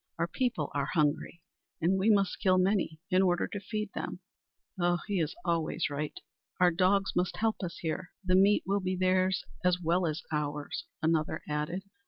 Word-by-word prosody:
Our 165 +1 0
people 175 - -1
are 140 -1 0
hungry, 155 +1 0 0.4
and 185 +4 +2
we 200 +4 +3
must 200 -3 +3
kill 185 -1 +4
many 185 -4 +1
in 185 +1 +5
order 175 -2 +2
to 205 - -5
feed 210 +1 -4
them!" - - -4 0.6
"Ugh, 175 0 +2
he 205 -3 -1
is 160 -1 -1
always 165 -3 0
right! 145 +1 -4 0.4
Our 180 -1 +5
dogs 190 +3 +2
must 180 0 0
help 220 0 +1
us 170 -3 -4
here. 170 +2 -3 0.2
The 185 - +2
meat 195 +3 +5
will 200 +1 +1
be 185 -1 -1
theirs 185 0 +2 0.2
as 180 -1 +3
well 175 +1 +1
as 155 +1 -3
ours," 150 -1 -3 0.2
another 160 -1 +1
added. 150 +5 -2
180 Hz, 180 wpm, -30 LUFS, 160-190 Hz, 0.6 s, in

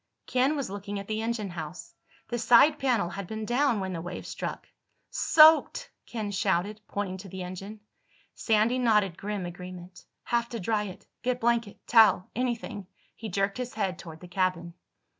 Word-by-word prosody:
Ken 260 +4 +2
was 275 -9 -3
looking 205 0 -5
at 200 0 -6
the 215 0 -2
engine 225 -4 -2
house. 175 +1 -7 0.4
The 240 0 -2
side 245 +7 +6
panel 235 -10 +1
had 195 +1 -6
been 220 +1 -5
down 245 0 +2
when 190 -1 -3
the 165 - -4
wave 175 +2 -6
struck. - - -5 0.4
"Soaked!" 320 +10 +5 0.2
Ken 215 -3 -4
shouted, 200 +2 0
pointing 195 -2 -3
to 190 +1 -10
the 185 +1 -6
engine. 195 +4 -8 0.5
Sandy 225 +3 +2
nodded 210 -7 +3
grim 205 -1 -4
agreement. 180 +1 -9 0.2
"Have 235 0 0
to 230 - -5
dry 210 +2 0
it. 190 -1 -9 0.2
Get 250 0 -1
blanket—towel—anything." 230 -1 +2 0.3
He 225 - -7
jerked 195 +3 -1
his 250 -2 -5
head 190 -4 -2
toward 160 -3 -10
the 180 - -10
cabin. 175 -1 -1
205 Hz, 160 wpm, -28 LUFS, 185-235 Hz, 0.5 s, side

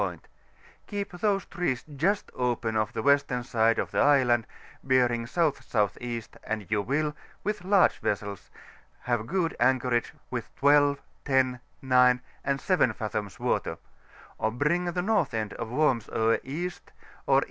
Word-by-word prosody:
point: - - -5 0.6
keep 205 -1 -4
these 195 +1 0
trees 175 -10 -2
just 195 +9 0
open 120 -3 -1
of 110 -1 0
the 110 - -4
western 140 -2 +2
side 115 -2 +2
of - - -2
the - - 0
island, 125 -5 +4 0.4
bearing 120 -3 +2
S.S.E., 120 - -1 0.2
and 110 -3 -4
you 105 -1 +2
will, 150 +6 -1 0.3
with 210 -3 -2
larse 195 0 +4
vessels, 100 -2 -3 0.5
have 120 -2 -1
good 175 -3 0
anchorage 125 -1 +2 0.2
with - - -4
12, 145 0 +4 0.3
10, 130 -2 +2 0.2
9, 125 -1 +5 0.2
and 140 0 0
7 175 - +2
fathoms 105 -3 -4
water; - - -1 0.6
or 110 - +1
bring 150 +10 0
the 175 0 -1
north 195 - +1
end 110 -2 -2
of 115 - -5
Worms 125 -4 +1
Oe 115 +1 +2
East, 170 +7 -5 0.4
or - - +5
E. - - +7
130 Hz, 145 wpm, -27 LUFS, 115-155 Hz, 0.6 s, E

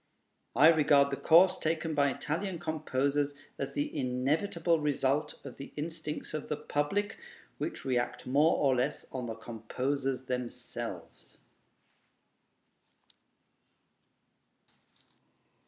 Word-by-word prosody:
I 155 - +8
regard 145 -3 +5
the - - 0
course 175 +6 +5
taken 160 0 -1
by 145 -1 +3
Italian 170 +7 -3
composers 145 -3 -1 0.2
as - - -3
the 290 0 -2
inevitable 155 +7 +1
result 145 -1 0
of - - -9
the 140 - -9
instincts 150 0 -5
of 155 - -4
the 150 - -1
public, 150 +7 -1 0.4
which - - -4
react 125 -2 -1
more 145 +6 +4
or 135 -3 +3
less 135 +4 -1
on 125 -2 -4
the 115 - -4
composers 130 +4 -3
themselves. 125 -1 -6
145 Hz, 105 wpm, -31 LUFS, 130-160 Hz, 0.4 s, I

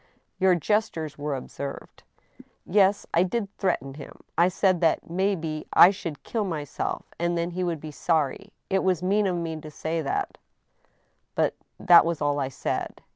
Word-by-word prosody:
" - - -47
Your 185 -1 +5
gestures 165 -5 -1
were 145 -1 -2
observed." 140 +1 -7 0.4
" - - -14 0.2
Yes, 200 +1 +3
I 170 - +4
did 200 +2 -2
threaten 135 -8 -1
him. 140 0 -11 0.2
I 170 +2 +5
said 185 -1 +2
that 165 0 +1
may 190 +3 +1
be 155 -3 -5
I 180 - +9
should 165 -6 -7
kill 225 -2 -2
my 165 -6 -3
self, 145 - -4
and 170 0 0
then 170 +1 -1
he 180 +1 -2
would 170 -3 -1
be 155 +1 -8
sorry.... 160 +6 -1 0.2
It 190 0 +1
was 185 -2 +1
mean 200 +2 +2
of 180 - 0
me 165 -2 -4
to 155 - -9
say 160 +2 -3
that, 140 - -3 1.0
but - - +2 0.3
that 175 -1 +7
was 170 -1 -1
all 145 -1 0
I 135 - 0
said." 130 - -4
170 Hz, 185 wpm, -26 LUFS, 155-190 Hz, 1.0 s, I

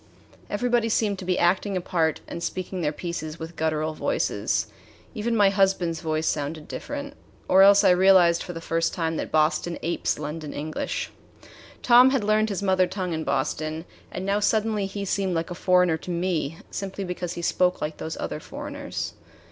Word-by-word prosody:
Everybody 235 +2 +1
seemed 210 -3 +1
to 185 - -7
be 180 0 +1
acting 190 +3 +2
a - - +1
part 165 -3 0
and 170 - -6
speaking 185 +1 -4
their 150 -2 +1
pieces 155 -1 -5
with 165 +1 -8
guttural 155 0 -1
voices. - - 0 0.5
Even 230 0 -1
my 205 -3 +5
husband's 190 -4 +1
voice 155 0 -1
sounded 150 +1 -2
different 285 -1 -6 0.3
or 190 - +6
else 200 +1 +7
I - - +6
realized 180 -2 +5
for 180 - -6
the 165 - -7
first 165 0 -1
time 165 -2 -1
that - - -4
Boston 155 +2 +1
apes 170 +1 -1
London 150 0 -5
English. 155 - -4 0.7
Tom 250 +1 +7
had 265 -4 +1
learned 215 +1 +2
his 200 -1 -3
mother 185 -1 +3
tongue 185 -1 -3
in 160 0 -2
Boston, 155 +4 -2 0.3
and 185 - -5
now 200 +1 +1
suddenly 210 -1 +1
he 200 +1 -5
seemed 190 -2 0
like 165 +2 -2
a - - -1
foreigner 180 -2 +3
to 170 - -11
me 170 -3 -1
simply 195 0 -4
because 180 -1 -4
he 170 - -6
spoke 180 +2 +2
like 150 0 -4
these 160 - -5
other - - -4
foreigners. - - -6
180 Hz, 180 wpm, -25 LUFS, 160-200 Hz, 0.7 s, else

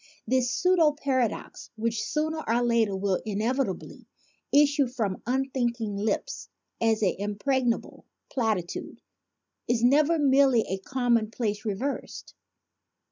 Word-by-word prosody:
This 255 +1 +1
pseudo 345 -1 +3
paradox, 260 -6 -2
which 225 0 -1
sooner 315 +1 -1
or 235 +2 +2
later 230 -4 +2
will 190 -1 0
inevitably 220 +1 -2 0.4
issue 285 -1 +4
from 225 -7 -3
unthinking 245 -4 -1
lips 205 +1 -2 0.3
as 225 -1 +2
an 190 - +3
impregnable 235 +4 -1 0.3
platitude, 215 -9 -2 0.7
is 240 -1 +1
never 295 +6 +4
merely 270 -4 +4
a 190 -2 -4
commonplace 230 -2 -1
reversed. 225 +7 -4
240 Hz, 105 wpm, -27 LUFS, 215-270 Hz, 0.7 s, issue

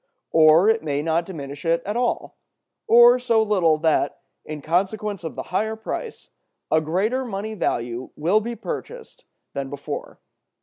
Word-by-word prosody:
Or 160 +4 +6
it 225 0 +3
may 145 -1 -2
not 165 +1 0
diminish 140 -6 -7
it 165 0 +1
at 205 +2 -3
all, 245 0 -1 0.5
or 240 +2 +7
so 230 -3 +2
little 185 -7 +2
that, 160 0 +1 0.2
in 150 -2 -7
consequence 195 +4 -1
of 160 - -5
the - - -4
higher 220 +3 0
price, 325 - -6 0.4
a 155 - +4
greater 200 +12 0
money 215 -2 -4
value 120 - -2
will 175 +8 +2
be 235 +2 -5
purchased 475 - -8 0.3
than 140 -1 -4
before. 145 +1 -7
185 Hz, 150 wpm, -23 LUFS, 155-220 Hz, 0.5 s, or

